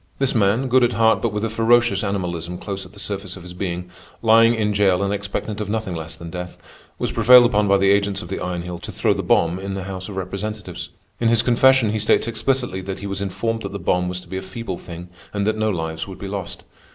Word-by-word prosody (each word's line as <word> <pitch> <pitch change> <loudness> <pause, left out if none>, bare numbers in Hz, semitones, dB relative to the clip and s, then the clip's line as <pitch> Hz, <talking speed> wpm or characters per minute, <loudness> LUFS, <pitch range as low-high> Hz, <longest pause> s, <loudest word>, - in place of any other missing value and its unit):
This 135 -1 +1
man, 110 +4 +2
good 130 0 +4
at 120 0 +2
heart 110 0 +3
but 115 - 0
with 105 +2 -2
a - - +1
ferocious 115 -2 +3
animalism 90 -4 -3
close 95 0 -5
at 90 - -20
the - - -16
surface 100 -2 -4
of 90 - -11
his 90 0 -10
being, 90 -1 -4 0.3
lying 115 +1 +6
in 105 -2 0
jail 100 -2 +3
and 100 0 0
expectant 105 +1 -4
of 105 - -4
nothing 110 -3 -2
less 80 -1 -6
than 85 0 -9
death, 90 0 -6 0.4
was - - -2
prevailed 120 +2 +7
upon 105 -3 +2
by 100 0 +5
the 100 0 +4
agents 100 -1 +1
of - - -8
the 95 - -4
Iron 90 -1 -3
Heel 90 -1 -6
to - - -7
throw - - +1
the - - -3
bomb 85 +2 +2
in 95 0 -4
the 95 - -4
House 95 0 -6
of 100 - -7
Representatives. 100 +2 -5 0.3
In 115 - +1
his 115 0 +3
confession 125 -1 +4
he 110 - -1
states 105 +1 +2
explicitly 120 -3 -1
that 95 0 -6
he - - -6
was 100 -1 -3
informed 105 +4 -2
that 100 -2 -6
the - - -3
bomb 90 0 0
was 90 0 -4
to - - -16
be 95 - -5
a - - -3
feeble 95 0 -6
thing 85 0 -9 0.2
and 100 -1 -1
that 110 +1 +1
no 110 0 0
lives 80 -3 -3
would 95 - -8
be 100 - -6
lost. 95 -2 -5
100 Hz, 255 wpm, -21 LUFS, 90-110 Hz, 0.4 s, prevailed